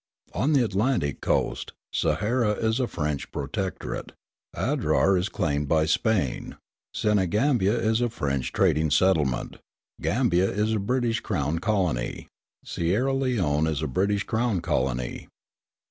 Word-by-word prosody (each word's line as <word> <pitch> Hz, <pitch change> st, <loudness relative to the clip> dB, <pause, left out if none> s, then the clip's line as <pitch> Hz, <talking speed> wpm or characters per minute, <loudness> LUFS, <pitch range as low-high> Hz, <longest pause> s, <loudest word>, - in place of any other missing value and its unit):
On 130 Hz, -, +1 dB
the 130 Hz, -4 st, +4 dB
Atlantic 100 Hz, -, 0 dB
coast, -, -, -1 dB, 0.2 s
Sahara 110 Hz, +1 st, +1 dB
is 110 Hz, +3 st, 0 dB
a 125 Hz, -, +1 dB
French 75 Hz, -, -3 dB
protectorate, 95 Hz, +7 st, -4 dB, 0.4 s
Adrar 95 Hz, -, +2 dB
is 90 Hz, +3 st, 0 dB
claimed 75 Hz, -5 st, -1 dB
by 80 Hz, +1 st, +3 dB
Spain, 80 Hz, -, 0 dB, 0.3 s
Senegambia 105 Hz, -, +2 dB
is 110 Hz, 0 st, +1 dB
a 120 Hz, -, +1 dB
French 70 Hz, -, -2 dB
trading 80 Hz, -4 st, +2 dB
settlement, 75 Hz, -6 st, +1 dB, 0.4 s
Gambia 100 Hz, -6 st, +2 dB
is 105 Hz, +2 st, 0 dB
a 110 Hz, -, +1 dB
British 115 Hz, +2 st, 0 dB
crown 75 Hz, -3 st, -1 dB
colony, 90 Hz, -, -1 dB, 0.4 s
Sierra 105 Hz, +11 st, 0 dB
Leone 95 Hz, -, +1 dB
is 80 Hz, -1 st, -1 dB
a -, -, 0 dB
British 100 Hz, +8 st, 0 dB
crown 110 Hz, -1 st, 0 dB
colony. 65 Hz, -6 st, -2 dB
95 Hz, 125 wpm, -26 LUFS, 75-110 Hz, 0.4 s, the